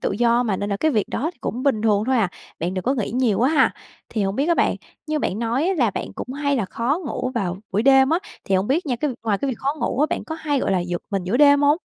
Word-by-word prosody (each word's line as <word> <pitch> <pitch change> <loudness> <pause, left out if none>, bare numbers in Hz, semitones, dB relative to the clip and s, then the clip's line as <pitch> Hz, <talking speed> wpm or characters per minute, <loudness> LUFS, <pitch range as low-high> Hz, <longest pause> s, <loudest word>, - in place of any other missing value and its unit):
tự - - 0
do 235 +3 +3
mà 210 -5 0
nên 205 0 -3
là 200 - 0
cái 315 +9 +1
việc 215 -7 0
đó 310 +7 -2
thì - - -32
cũng 250 +2 -3
bình 265 -7 +1
thường 210 -1 +2
thôi 260 -1 +2
à, 215 -5 +2 0.3
bạn 175 +3 -2
đừng 185 - -2
có 265 - +2
nghĩ 230 -7 -2
nhiều 240 -4 +1
quá 255 +3 +3
ha. 315 - +3 0.3
Thì 220 - -2
hổng 195 +1 -1
biết 280 - +1
á 340 - +4
bạn, - - +2 0.3
như 305 0 -1
bạn 200 - -2
nói 235 +7 0
á 385 - +1
là 245 -9 +2
bạn - - -5
cũng 250 +4 -6
hay 285 0 0
là 225 - 0
khó 240 - -1
ngủ 255 - -3
vào 185 -6 -1 0.2
buổi 205 +3 +1
đêm 270 +2 +5
á, 330 - +3 0.3
thì 195 - 0
hông 190 +2 +2
biết 310 +5 +1
nha 250 - 0
cái 295 +5 -1
vi - - -5
ngoài 205 -3 +1
cái 280 - -2
việc 235 - -5
khó 280 +2 -1
ngủ 260 - -1
á, 300 - +4
bạn - - -2
có 320 - -5
hay, 295 -4 -1
gọi - - 0
là, 185 - +2
giật 175 0 -3
mình 195 -3 -1
giữa 205 +7 0
đêm 285 0 +6
hông? 290 +3 +4
245 Hz, 315 wpm, -22 LUFS, 205-285 Hz, 0.3 s, đêm